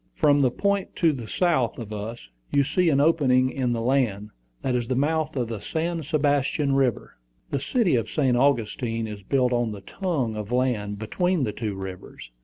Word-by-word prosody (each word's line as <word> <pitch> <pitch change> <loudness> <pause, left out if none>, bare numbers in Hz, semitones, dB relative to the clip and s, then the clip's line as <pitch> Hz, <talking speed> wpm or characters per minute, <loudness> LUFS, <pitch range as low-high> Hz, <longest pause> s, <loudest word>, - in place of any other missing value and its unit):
"From 145 -3 +4
the 130 - +4
point 200 +8 -1
to 165 -3 +3
the 120 -5 -6
south 155 -9 +1
of 110 -3 -7
us, 105 - -6 0.2
you 140 - +3
see 165 +5 +2
an 140 -3 +3
opening 130 -5 +3
in 130 -3 -1
the 115 -1 -1
land: 115 -6 0 0.3
that 130 - 0
is 120 -2 -1
the 130 - 0
mouth 155 +3 0
of 125 -3 -1
the 115 -2 -5
San 165 - -2
Sebastian 145 -1 +1
River. 135 -4 0 0.3
The 140 - 0
city 205 - +1
of 115 -3 +1
St. 135 -5 +1
Augustine 120 -3 +1
is 105 -2 -7
built 125 +5 +1
on 120 -2 0
the 100 - -9
tongue 140 - -2
of 105 +1 -5
land 120 -5 0
between 175 - 0
the 110 - -1
two 105 -3 -4
rivers. 95 -9 -8
130 Hz, 195 wpm, -25 LUFS, 115-150 Hz, 0.3 s, From